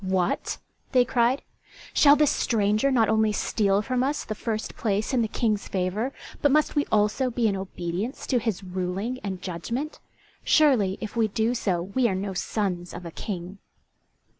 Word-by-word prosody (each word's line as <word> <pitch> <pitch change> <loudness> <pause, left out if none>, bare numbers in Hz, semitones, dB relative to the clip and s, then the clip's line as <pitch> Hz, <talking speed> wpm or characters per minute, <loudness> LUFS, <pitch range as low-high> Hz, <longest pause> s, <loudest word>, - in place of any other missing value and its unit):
"What?" 185 -2 0 0.4
they 250 -1 +5
cried, 245 +2 +2 0.5
"shall 285 -1 +7
this 295 -1 +3
stranger 215 +3 +2
not 235 -5 +3
only 220 -1 +3
steal 205 -1 +1
from 250 +3 0
us 280 +3 -1
the 215 - -3
first 220 0 -4
place 210 +2 -1
in 250 - +3
the 225 - +1
King's 215 -2 -1
favour, 195 +7 -1 0.3
but 290 - +4
must 305 +2 +2
we 290 - +1
also 215 +5 +2
be 235 -1 +1
in 200 - +1
obedience 190 - -4
to 250 - +2
his 215 -4 -2
ruling 190 +6 -3
and 190 -2 -4
judgment? 230 - -4 0.4
Surely 245 -11 +4
if 215 0 -6
we 225 -2 +3
do 220 +3 0
so 185 -7 0
we 235 +7 +1
are 190 - -1
no 195 +1 -3
sons 180 -2 -2
of 175 0 -8
a 170 - -6
King." 185 +1 -6
215 Hz, 175 wpm, -26 LUFS, 190-245 Hz, 0.5 s, shall